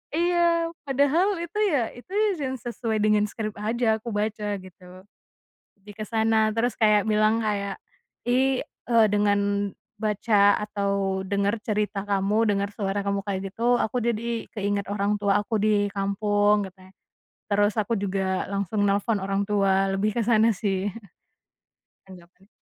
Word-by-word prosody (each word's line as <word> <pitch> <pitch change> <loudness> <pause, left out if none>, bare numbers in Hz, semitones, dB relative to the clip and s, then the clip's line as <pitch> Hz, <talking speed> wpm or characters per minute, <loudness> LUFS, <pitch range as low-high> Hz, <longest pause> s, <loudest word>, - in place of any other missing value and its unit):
Iya 340 -1 +2 0.2
padahal 285 +7 +3 0.2
itu 340 +4 -7
ya 290 - +2
itu 245 +9 -15 0.3
yang 265 -2 -2
sesuai 235 -2 -3
dengan 210 0 +3
script 215 0 -5
aja 220 +1 0
aku 220 - -15
baca 210 -1 -2
gitu. 185 0 -14 0.7
Lebih 205 +1 -13
ke - - -3
sana, 220 -1 +3
terus 230 +1 0
kayak 210 -2 +4
bilang 215 +1 +2
kayak, 200 -2 -2 0.5
"Ih", 260 +2 +1 0.2
eee, 230 -2 +5
"dengan 205 -1 +3 0.6
baca 205 -1 +3
atau 200 -2 -1
dengar 200 +3 -1
cerita 210 -2 -1
kamu 205 +3 +2
dengar 200 0 0
suara 200 -1 -2
kamu 200 0 0
kayak 195 -1 -4
gitu 240 +3 +2
aku 245 +2 -1
jadi 235 0 -2
keinget 200 -1 -2
orang 205 0 0
tua 200 0 +3
aku 220 -3 -1
di 210 -1 +3
kampung," 205 +1 +1
katanya. 185 0 -19 0.5
terus 205 +1 +1
aku 215 +2 0
juga 190 -2 -1
langsung 200 +1 -1
nelpon 200 +1 +1
orang 195 +1 -1
tua 195 -2 +2
lebih 205 +2 +1
kesana 225 0 +3
sih. 200 -1 -1 1.2
Tanggapannya. 180 +1 -16
210 Hz, 140 wpm, -25 LUFS, 200-225 Hz, 1.2 s, eee